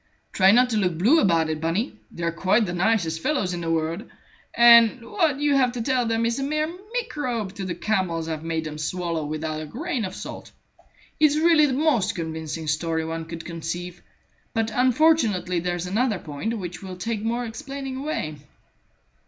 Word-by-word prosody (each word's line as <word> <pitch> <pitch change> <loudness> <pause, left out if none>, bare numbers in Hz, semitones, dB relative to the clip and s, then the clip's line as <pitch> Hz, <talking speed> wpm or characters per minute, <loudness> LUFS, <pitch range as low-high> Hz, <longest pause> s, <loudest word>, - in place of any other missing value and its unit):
Try 190 -1 +5
not 250 +4 +5
to 220 - +1
look 180 -5 0
blue 240 - +5
about 165 - +3
it, 155 -1 -3
Bunny. 170 - -1 0.2
They're 170 0 -3
quite 190 +6 +2
the 175 - -4
nicest 175 -4 +1
fellows 205 - 0
in 175 - -4
the 165 - -3
world, 165 +4 -1 0.5
and 235 0 +6
what 320 - +1
you 295 0 +2
have 255 -3 +3
to 245 - -3
tell 250 -1 +1
them 225 0 +1
is 235 +2 0
a - - -1
mere 305 +3 -1 0.2
microbe 250 - -2
to 195 -2 -5
the 175 -2 -3
camels 175 -5 -1
I've 160 -1 -4
made 165 -1 -2
them 155 -1 -6
swallow 170 0 -2
without 155 +1 -3
a 155 - -7
grain 270 - -3
of 190 -1 -5
salt. - - -8 0.7
It's 300 -1 +4
really 315 -1 +5
the 265 - -1
most 275 -8 +1
convincing 160 -1 -4
story 160 +1 -1
one 165 0 -4
could 165 0 -8
conceive; 170 +1 -5 0.5
but 225 0 0
unfortunately 245 - +3
there's 175 0 -2
another 215 +3 0
point 175 +8 -4
which 180 -3 -6
will 190 -1 -7
take 225 +2 -3
more 235 +2 -1
explaining 265 +4 -6
away." 265 - -3
195 Hz, 185 wpm, -24 LUFS, 165-250 Hz, 0.7 s, and